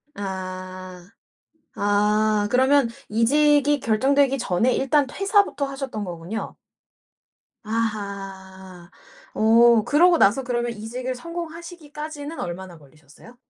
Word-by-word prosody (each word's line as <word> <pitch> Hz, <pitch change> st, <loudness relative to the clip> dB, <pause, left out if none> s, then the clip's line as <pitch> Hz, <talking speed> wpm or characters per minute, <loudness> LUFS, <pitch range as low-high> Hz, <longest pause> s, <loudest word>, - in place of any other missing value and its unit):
아. 185 Hz, -2 st, -7 dB, 0.7 s
아 210 Hz, +1 st, +1 dB
그러면 260 Hz, +1 st, +4 dB, 0.2 s
이직이 290 Hz, +5 st, +3 dB
결정되기 270 Hz, +5 st, +2 dB
전에 230 Hz, +3 st, +1 dB
일단 275 Hz, +2 st, +2 dB
퇴사부터 395 Hz, -3 st, +1 dB
하셨던 270 Hz, -6 st, -5 dB
거군요? 175 Hz, +4 st, -6 dB, 1.1 s
아하. 195 Hz, -4 st, -5 dB, 0.4 s
어 230 Hz, +1 st, +5 dB
그러고 340 Hz, +7 st, +4 dB
나서 235 Hz, +1 st, +3 dB
그러면 240 Hz, -1 st, -2 dB
이직을 245 Hz, +4 st, -5 dB
성공하시기까지는 320 Hz, -1 st, -8 dB
얼마나 175 Hz, 0 st, -6 dB
걸리셨어요? 155 Hz, -, -19 dB
230 Hz, 250 characters per minute, -23 LUFS, 195-285 Hz, 1.1 s, 어